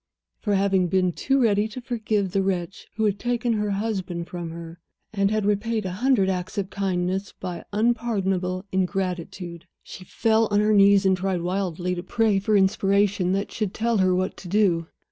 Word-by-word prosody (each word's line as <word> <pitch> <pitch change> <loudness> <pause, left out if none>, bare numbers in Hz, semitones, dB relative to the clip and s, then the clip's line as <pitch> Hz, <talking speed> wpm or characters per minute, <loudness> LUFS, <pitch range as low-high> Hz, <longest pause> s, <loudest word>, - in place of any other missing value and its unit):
For 205 -2 0
having 190 -2 +2
been 185 0 +2
too 270 +8 +1
ready 210 -3 +3
to 220 +4 -8
forgive 220 -5 -1
the 195 +1 +1
wretch 190 -1 -3
who 220 0 0
had 200 -1 0
taken 240 0 0
her 210 -1 -1
husband 195 -4 -2
from 175 -2 -6
her, 165 0 -9 0.3
and 200 -1 +2
had 215 -1 0
repaid 210 +1 0
a 185 - -2
hundred 215 0 +2
acts 185 +1 -3
of 195 -1 -2
kindness 190 0 -2
by 180 -2 -6
unpardonable 200 -5 0
ingratitude. 180 -2 -3 0.2
She 185 - -10
fell 225 +3 +1
on 205 0 +2
her 210 +1 +3
knees; 200 -1 +6
she 190 -1 +4
tried 185 -1 -1
wildly 180 -1 -2
to 175 - -4
pray 210 +2 +1
for 205 +2 +2
inspiration 195 -1 +2
that 195 +1 -2
should 210 -3 -3
tell 230 -1 +1
her 185 -1 +3
what 185 +1 -1
to 185 - -10
do. 175 -4 +2
195 Hz, 185 wpm, -24 LUFS, 185-210 Hz, 0.3 s, knees